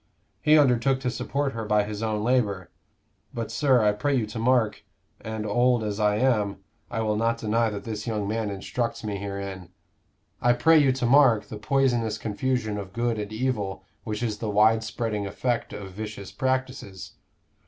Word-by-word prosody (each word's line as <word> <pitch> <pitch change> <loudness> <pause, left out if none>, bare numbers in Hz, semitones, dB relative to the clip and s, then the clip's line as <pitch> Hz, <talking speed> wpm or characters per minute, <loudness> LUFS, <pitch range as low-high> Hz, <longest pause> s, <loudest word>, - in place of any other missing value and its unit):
He 155 +1 +5
undertook 130 -2 +3
to 125 -2 -1
support 140 +3 -2
her 115 - -4
by 105 -1 +2
his 105 0 -5
own 110 -2 -1
labor; 105 -7 0 0.6
but, 115 -2 -4
sir, 130 -6 +3
I 105 - +4
pray 140 +7 0
you 120 -4 +1
to 110 +2 -7
mark 120 -2 +2 0.4
and 110 -1 -5
old 120 +2 +2
as 105 0 -3
I 105 -1 +3
am, 105 -4 +1 0.3
I 115 -1 -2
will 105 -1 0
not 115 +2 +1
deny 115 +1 +1
that 100 -2 -6
this 110 +1 -5
young 105 -3 -1
man 110 0 -1
instructs 115 +4 -3
me 105 -2 -3
herein 100 -2 -6 0.7
I 120 0 +4
pray 155 +7 +5
you 140 -3 +4
to 130 -1 -1
mark 125 -4 +5
the 110 - -6
poisonous 120 -3 +1
confusion 110 -1 -2
of 95 -2 -8
good 115 -1 -1
and 105 0 -5
evil 110 -5 -2 0.2
which 110 +1 -4
is 105 -3 -2
the 110 - -3
wide 110 +2 +4
spreading 110 -3 -3
effect 120 +4 -2
of 95 -2 -7
vicious 105 -1 -7
practices. 130 -7 -3
110 Hz, 180 wpm, -26 LUFS, 105-125 Hz, 0.7 s, He